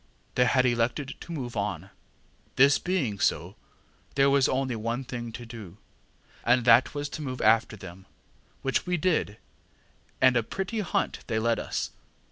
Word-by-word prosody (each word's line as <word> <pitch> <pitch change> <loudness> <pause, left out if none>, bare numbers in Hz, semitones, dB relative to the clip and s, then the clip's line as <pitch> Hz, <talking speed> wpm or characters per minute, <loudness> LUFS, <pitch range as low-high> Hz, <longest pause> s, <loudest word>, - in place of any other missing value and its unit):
They 125 - +3
had 130 0 +3
elected 125 +3 0
to - - -10
move 125 -7 -5
on. 100 -3 -3 0.6
This 140 +2 +6
being 145 - -1
so, - - 0 0.6
there 140 0 +4
was 140 -1 +4
only 130 -2 0
one 115 +4 -2
thing 120 -2 -6
to 120 - -7
do, 110 -6 -10 0.7
and 120 0 +3
that 120 +4 +5
was 145 0 -2
to 155 - -6
move 130 -3 -4
after 110 0 +3
them, 95 0 -11 0.6
which 135 +5 0
we 180 0 +1
did, 155 - 0 0.8
and 130 -1 +5
a 120 - +4
pretty 190 - -4
hunt 195 - -1
they 110 - -1
led 115 +1 +1
us. - - -3
125 Hz, 160 wpm, -27 LUFS, 115-140 Hz, 0.8 s, This